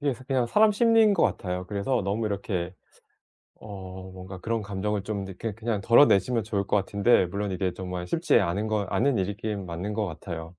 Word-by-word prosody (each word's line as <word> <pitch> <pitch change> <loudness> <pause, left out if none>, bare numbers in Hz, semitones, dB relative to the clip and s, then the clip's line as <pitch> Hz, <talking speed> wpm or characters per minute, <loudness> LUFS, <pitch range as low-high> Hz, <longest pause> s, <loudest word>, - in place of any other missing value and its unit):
이게 140 -3 0
사 130 - -14
그냥 130 -3 0
사람 215 - +4
심리인 225 -1 +4
것 170 - +2
같아요. 90 0 -2
그래서 105 +5 -1
너무 105 +3 -1
이렇게 95 -3 -3 0.8
어 95 -2 -9
뭔가 95 0 -9
그런 115 +3 -2
감정을 100 0 -3
좀 100 -2 -3
이렇게 105 +3 -5
그냥 110 -2 -3
덜어내시면 115 -1 +4
좋을 100 -3 -2
것 - - +1
같은데 100 +2 +3
물론 100 +2 -3
이게 95 -1 -1
정말 90 -1 -5
쉽지 165 - +3
않은 100 +2 -1
거 105 -2 0
않은 140 -5 +1
일이긴 100 +1 -3
맞는 90 +5 -4
것 105 -1 -1
같아요. 80 -1 -6
100 Hz, 390 characters per minute, -26 LUFS, 95-115 Hz, 0.8 s, 사람